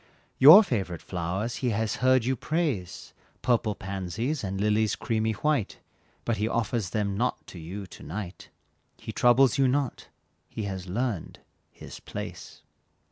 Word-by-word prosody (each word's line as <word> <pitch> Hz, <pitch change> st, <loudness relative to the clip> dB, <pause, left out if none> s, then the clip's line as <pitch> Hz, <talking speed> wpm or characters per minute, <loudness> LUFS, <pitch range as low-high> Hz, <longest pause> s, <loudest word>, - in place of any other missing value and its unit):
Your 160 Hz, +11 st, +11 dB
favorite 95 Hz, -, -3 dB
flowers 95 Hz, +6 st, -3 dB
he 125 Hz, -, -1 dB
has 110 Hz, 0 st, -1 dB
heard 130 Hz, -2 st, +3 dB
you 130 Hz, +1 st, +1 dB
praise, 140 Hz, -, -3 dB, 0.3 s
Purple 115 Hz, -4 st, +1 dB
pansies, 100 Hz, -, -3 dB
and 95 Hz, 0 st, -3 dB
lilies 105 Hz, +1 st, +2 dB
creamy 110 Hz, -1 st, -1 dB
white; 145 Hz, -3 st, -1 dB, 0.5 s
But 115 Hz, -2 st, 0 dB
he 105 Hz, -, 0 dB
offers 115 Hz, -3 st, -1 dB
them 100 Hz, -1 st, -1 dB
not 125 Hz, +5 st, -1 dB
to 90 Hz, -, -11 dB
you 95 Hz, +5 st, -7 dB
to 90 Hz, -, -14 dB
night, 95 Hz, +1 st, -7 dB, 0.5 s
He -, -, -7 dB
troubles 125 Hz, +2 st, +4 dB
you 135 Hz, -, +5 dB
not, 135 Hz, -1 st, -1 dB, 0.4 s
he 110 Hz, -, -5 dB
has 95 Hz, -2 st, -5 dB
learned 110 Hz, -2 st, -3 dB, 0.3 s
"his -, -, -11 dB
place." -, -, -8 dB
110 Hz, 145 wpm, -27 LUFS, 95-125 Hz, 0.5 s, Your